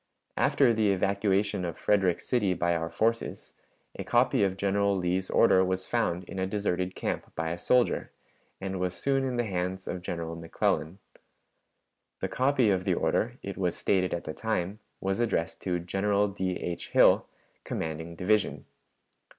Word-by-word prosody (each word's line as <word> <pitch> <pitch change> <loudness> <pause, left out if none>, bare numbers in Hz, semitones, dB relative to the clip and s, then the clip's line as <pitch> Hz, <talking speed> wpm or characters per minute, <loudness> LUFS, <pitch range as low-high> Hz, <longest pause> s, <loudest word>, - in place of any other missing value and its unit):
After 130 -4 +3
the 110 -2 +2
evacuation 100 0 +1
of 85 -2 -4
Frederick 95 -4 +2
City 105 -7 +1
by 85 0 +1
our 80 0 -2
forces, 115 +4 -1 0.4
a - - -6
copy - - +3
of 95 -1 0
General 100 0 +1
Lee's 90 +1 -1
order 95 0 +5
was 95 0 -1
found 90 -7 0
in 95 +1 -7
a 95 - 0
deserted 95 -2 -1
camp - - -3
by 80 0 -2
a 85 - -3
soldier, 125 +5 +2 0.5
and 95 -1 -4
was 90 0 -1
soon 135 +4 +1
in 130 -2 -1
the 120 - +1
hands 95 -2 -3
of 90 - -4
General 85 -2 -4
McClellan. 85 +1 -1 1.2
The - - -2
copy 130 -4 +2
of 95 -1 +1
the 95 -2 +1
order, - - 0
it - - -5
was - - 0
stated 90 -2 +1
at 85 - -2
the 80 - -5
time, 105 -1 -2 0.2
was 95 +2 -1
addressed 105 -7 -1
to 90 -2 -1
'General 100 +4 +1
D. 95 -2 -2
H 85 -1 -5
Hill, - - +5 0.4
commanding 80 +1 -4
division.' 105 +4 0
95 Hz, 165 wpm, -28 LUFS, 90-105 Hz, 1.2 s, order